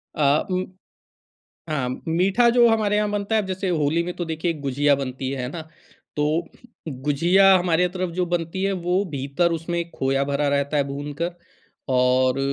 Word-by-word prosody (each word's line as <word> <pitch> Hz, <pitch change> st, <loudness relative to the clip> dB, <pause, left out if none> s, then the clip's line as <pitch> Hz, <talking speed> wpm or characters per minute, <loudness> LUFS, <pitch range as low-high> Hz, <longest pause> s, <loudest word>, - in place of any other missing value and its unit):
अ, 145 Hz, 0 st, +2 dB
उ, 185 Hz, 0 st, 0 dB, 1.0 s
हाँ. 135 Hz, -5 st, -1 dB, 0.2 s
मीठा 190 Hz, +8 st, +3 dB
जो 240 Hz, 0 st, +5 dB
हमारे 215 Hz, -2 st, +2 dB
यहाँ 210 Hz, 0 st, +1 dB
बनता 205 Hz, +1 st, -1 dB
है 215 Hz, -, +3 dB
अब 195 Hz, -, -7 dB
जैसे 190 Hz, 0 st, -2 dB
होली 160 Hz, 0 st, +1 dB
में 180 Hz, +1 st, -4 dB
तो 175 Hz, -, -4 dB
देखिए 160 Hz, +1 st, -2 dB
गुझिया 140 Hz, +1 st, +2 dB
बनती 130 Hz, -1 st, -4 dB
है 130 Hz, -2 st, -3 dB
ना, 165 Hz, -, -6 dB, 0.5 s
तो 155 Hz, +3 st, 0 dB, 0.4 s
गुझिया 165 Hz, +8 st, +3 dB
हमारे 180 Hz, 0 st, +2 dB
तरफ 185 Hz, 0 st, -3 dB
जो 180 Hz, 0 st, 0 dB
बनती 175 Hz, +2 st, -2 dB
है 195 Hz, -, +1 dB
वो 180 Hz, +3 st, +2 dB
भीतर 140 Hz, +5 st, 0 dB
उसमें 170 Hz, +1 st, -2 dB
खोया 135 Hz, +1 st, 0 dB
भरा 140 Hz, +1 st, -1 dB
रहता 140 Hz, +1 st, 0 dB
है 140 Hz, -, +3 dB
भूनकर 145 Hz, +5 st, -4 dB, 0.6 s
और 130 Hz, +1 st, +2 dB
165 Hz, 170 wpm, -23 LUFS, 140-185 Hz, 1.0 s, जो